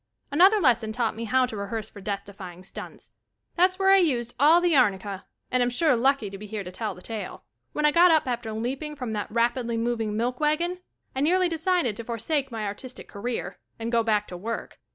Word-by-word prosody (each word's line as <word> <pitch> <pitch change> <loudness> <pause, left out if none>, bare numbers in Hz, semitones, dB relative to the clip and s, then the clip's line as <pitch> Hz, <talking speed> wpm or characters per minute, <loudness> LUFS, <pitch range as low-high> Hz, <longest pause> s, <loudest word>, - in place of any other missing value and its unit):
Another 380 +8 +6
lesson 240 - +3
taught 225 -1 -1
me 230 +1 -5
how 255 +3 +3
to 245 - -6
rehearse 210 +2 -4
for 200 - -12
death 200 0 -3
defying 185 -3 -10
stunts. - - -9 0.4
That's 370 +1 +3
where 385 0 +4
I 390 - +8
used 245 -10 +1
all 310 +5 +7
the 350 -2 +2
arnicka 200 -5 +1 0.3
and 255 - +2
am 245 - +3
sure 295 +3 +2
lucky 245 -4 +1
to 195 - -8
be 210 - -8
here 210 -1 -4
to 180 - -8
tell 215 0 -4
the 180 - -14
tail. 215 -4 -6 0.3
When 300 - 0
I 300 - +5
got 345 +3 +6
up 315 -3 +4
after 240 -3 -3
leaping 265 +7 -4
from 250 -6 -4
that 205 -1 -3
rapidly 235 0 0
moving 225 -2 -1
milk 245 +2 -1
wagon, 335 +4 0 0.4
I - - -1
nearly 360 +5 +3
decided 330 - 0
to 230 - -5
forsake 245 +5 -2
my 225 -2 -4
ar 200 - -2
tist 255 +4 -9
career, 230 +4 -5 0.2
and 230 0 -4
go 235 -1 +3
back 215 -2 +1
to 180 - -6
work. 225 +6 -5
235 Hz, 220 wpm, -26 LUFS, 215-300 Hz, 0.4 s, I